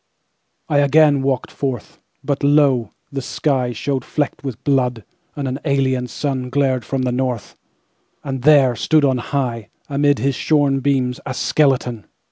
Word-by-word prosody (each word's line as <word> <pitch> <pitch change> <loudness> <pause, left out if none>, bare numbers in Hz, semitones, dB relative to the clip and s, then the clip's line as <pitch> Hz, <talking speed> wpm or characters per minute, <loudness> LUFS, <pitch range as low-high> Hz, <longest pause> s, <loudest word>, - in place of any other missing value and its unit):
I 145 - +2
again 145 0 +4
walked 135 -2 -1
forth; 130 -6 -5 0.2
But 140 -1 -2
lo! 140 -6 +3 0.2
the 135 -1 -3
skyShowed 130 -1 -1
flecked 145 -1 -3
with 130 -5 -6
blood, 125 -5 +1 0.3
and 140 -2 -3
an 130 +2 -3
alien 130 -3 0
sunGlared 130 -1 -1
from 135 -1 -2
the 125 - 0
north, 125 -2 -3 0.7
And 135 -2 -4
there 135 -3 +5
stood 155 +4 +2
on 130 -2 +1
high, 120 -4 -3 0.2
Amid 145 0 +2
his 140 0 0
shorn 145 -1 +2
beams, 130 -2 0
a 130 - -5
skeleton! 125 -6 +1
135 Hz, 140 wpm, -19 LUFS, 125-145 Hz, 0.7 s, there